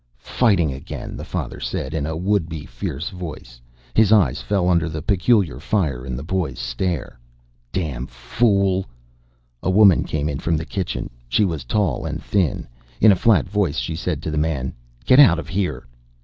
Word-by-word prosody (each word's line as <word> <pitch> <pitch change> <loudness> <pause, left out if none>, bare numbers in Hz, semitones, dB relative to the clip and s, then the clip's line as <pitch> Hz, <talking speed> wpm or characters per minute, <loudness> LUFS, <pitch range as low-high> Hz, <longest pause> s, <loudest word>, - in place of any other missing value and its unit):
"Fighting 95 - +3
again," 65 - -7
the - - -6
father - - -5
said, 65 - -4
in 75 -2 -1
a 80 0 -3
would 95 -1 0
be 75 -2 -6
fierce 65 +6 -5
voice. 80 - -9 0.3
His 110 -2 +4
eyes 75 - +4
fell 90 +7 0
under 85 -3 +2
the 80 -1 -5
peculiar 95 - +2
fire 70 -8 -1
in 60 - -3
the 65 - -5
boy's 90 +1 -2
stare. 75 +2 -3 0.5
"Damn 70 -9 -3
fool 95 - +1 0.4
" - - -40
A - - -1
woman 100 -2 +6
came 75 -1 -2
in 70 -3 -3
from 85 -1 0
the 80 - -4
kitchen. 95 -1 -4 0.2
She 105 - +3
was 80 -7 -3
tall 100 - 0
and - - -4
thin. 95 -8 -1 0.3
In 110 - +7
a - - +5
flat 105 +2 +3
voice 95 -6 0
she 80 - -2
said 80 - -3
to 80 - -3
the 75 - 0
man: 70 -5 -1 0.3
"Get 130 - +6
out 90 - +8
of 80 -3 -6
here." 90 -6 -2
80 Hz, 185 wpm, -21 LUFS, 70-95 Hz, 0.5 s, out